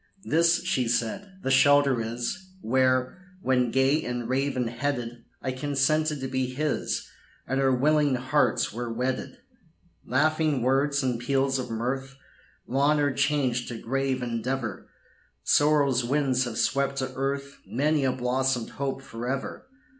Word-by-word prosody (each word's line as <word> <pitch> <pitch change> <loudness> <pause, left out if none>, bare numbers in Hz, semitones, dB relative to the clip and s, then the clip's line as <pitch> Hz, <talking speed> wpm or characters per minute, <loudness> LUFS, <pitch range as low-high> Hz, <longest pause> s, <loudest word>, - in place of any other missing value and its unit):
"This," 170 0 +3
she 130 -9 0
said, 120 - -1
"the 135 - 0
shelter 140 -2 +5
is, 120 - -5
Where, 130 +3 +1 0.2
when 125 -2 +2
gay 135 +5 +2
and 120 -1 -3
raven 130 -1 0
headed, 120 -1 -3 0.2
I 130 - -1
consented 145 +3 0
to 130 - -2
be 130 0 -1
his, 145 +4 -2 0.4
And 135 +2 0
our 135 -1 +3
willing 145 +2 +3
hearts 130 -2 +1
were 120 +1 -4
wedded. 130 - -3 0.7
"Laughing 155 0 +1
words 140 +2 +2
and 125 -3 0
peals 135 +2 +1
of 130 - -4
mirth, 130 +4 -3 0.5
Long 140 +4 +2
are 145 -2 +1
changed 130 -3 0
to 120 - -5
grave 135 +2 -1
endeavor; 120 -2 -3 0.5
Sorrow's 145 -4 +3
winds 130 0 +1
have 115 -2 -5
swept 140 +1 +1
to 130 -1 -3
earth 140 +1 -3
Many 150 +3 +1
a 130 - +2
blossomed 130 -1 -1
hope 135 -1 -4
forever. 130 - -5
130 Hz, 140 wpm, -26 LUFS, 125-145 Hz, 0.7 s, shelter